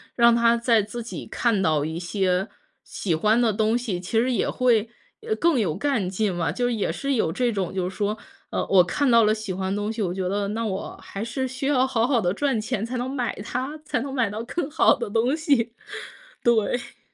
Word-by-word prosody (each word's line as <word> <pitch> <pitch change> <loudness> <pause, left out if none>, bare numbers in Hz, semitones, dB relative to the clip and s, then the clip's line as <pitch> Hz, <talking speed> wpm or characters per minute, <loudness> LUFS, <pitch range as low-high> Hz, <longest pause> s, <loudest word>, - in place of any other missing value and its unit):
让 235 -1 +6
他 235 0 +4
再 235 -1 +3
自 215 +4 -6
己 235 - -7
看 230 -5 +1
到 155 -5 +2
一 160 +2 -4
些 185 +1 0 0.4
喜 180 - -3
欢 215 +8 +3
的 230 -3 +3
东 220 +3 +2
西， 225 -8 -3
其 190 +5 0
实 250 +3 +1
也 240 - 0
会， 235 -4 +2 0.3
呃， 440 -1 -1
更 335 - +2
有 180 -8 0
干 220 -3 0
劲 195 +1 0
嘛。 165 -4 -1
就 245 +9 -1
也 220 -4 -1
是 275 0 -2
有 220 -10 +1
这 245 +6 0
种 195 -5 -2
就 185 -2 -1
是 190 - -11
说， 210 +1 -1 0.3
呃， - - -1
我 190 -2 +6
看 280 +10 0
到 230 -1 +6
了 215 - +4
喜 215 -3 -5
欢 190 +1 -2
的 205 - -2
东 210 +1 -2
西， 225 - -4
我 185 -4 0
觉 185 -1 -2
得， 200 +1 -1
那 225 +2 -2
我 195 -2 -4
还 200 - -6
是 250 +3 -2
需 260 +2 -4
要 260 -3 +3
好 240 -3 +1
好 255 -3 +2
地 175 -1 +1
赚 270 +1 0
钱 215 -1 -2
才 250 +2 -4
能 245 +1 -2
买 255 -3 -2
它， 260 +7 -4
才 305 - -1
能 275 +2 -5
买 250 -6 +1
到 215 +2 -4
更 285 +5 -3
好 305 - +4
的 235 - -4
东 230 +6 +1
西， 265 -7 +1 0.7
对。 240 +3 +1
225 Hz, 250 characters per minute, -24 LUFS, 195-250 Hz, 0.7 s, 让